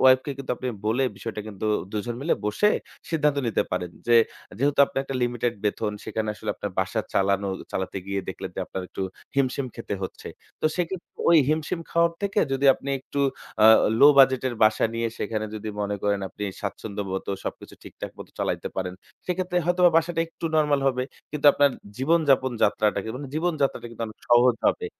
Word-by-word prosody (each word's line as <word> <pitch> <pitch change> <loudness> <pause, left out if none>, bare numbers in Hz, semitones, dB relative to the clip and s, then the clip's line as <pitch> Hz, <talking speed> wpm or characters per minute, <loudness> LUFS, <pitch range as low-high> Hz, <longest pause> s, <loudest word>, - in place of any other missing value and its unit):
wife 130 0 +7
কে - - -2 0.3
আপনি 130 - -4 0.2
বলে 115 +5 +2
বিষয়টা 115 -2 -5
কিন্তু 105 0 -5 0.3
2 - - -2
জন 120 - -2
মিলে 165 - +2
বসে 160 - +3 0.4
সিদ্ধান্ত 150 -3 +2
নিতে 115 - +1
পারেন 90 -1 -2 0.2
যে, 120 - +4 0.4
যেহেতু 140 +2 +2
আপনার 135 - -2
একটা 135 - -4
limited 120 -1 0
বেতন 105 0 0
সেখানে 110 0 -3
আসলে - - -4
আপনার - - -5
বাসা - - -1
চালানো 100 0 +2 0.2
চালাতে 95 +1 -3
গিয়ে 100 0 -1
দেখলেন - - -5
যে, - - -2
আপনার 95 - -5
একটু - - -5 0.3
হিমশিম 135 0 +1
খেতে - - -4
হচ্ছে। 95 - -6 0.3
তো, - - +2
সেক্ষেত্রে 180 0 -3 0.2
ওই 170 - +8
হিমশিম 155 +2 -1
খাওয়ার 170 0 +3
থেকে 200 +1 +1
যদি 135 +1 0
আপনি 140 - -9
একটু 140 +2 -4 0.4
আ - - +10 0.3
low 145 - +10
budget 130 -1 +6
এর 120 - -4
বাসা 110 0 +3
নিয়ে 115 0 0
সেখানে 110 0 -2
যদি 110 0 -5
মনে 100 0 -1
করেন 100 -1 +1
আপনি 105 - -6 0.2
স্বাচ্ছন্দ্যমত 100 -1 -4 0.2
সবকিছু - - -6
ঠিকঠাক - - -8
মতো - - -10
চালাইতে - - -1
পারেন, 90 -1 -2 0.3
সেক্ষেত্রে 180 0 -1
হয়তোবা 175 0 +5
বাসাটা 165 0 -1
একটু 165 - -11
normal 150 -2 +3
হবে 125 -1 -1 0.3
কিন্তু 150 -1 0
আপনার 145 0 +4 0.3
জীবনযাপন 135 -3 +3
যাত্রাটা, 105 -1 +2 0.4
জীবন 170 +2 0
যাত্রাটা 135 -3 0
কিন্তু 115 0 -4
অনেক 110 - -11
সহজ 120 0 +6
হবে। 445 - +1
125 Hz, 180 wpm, -25 LUFS, 105-150 Hz, 0.4 s, আ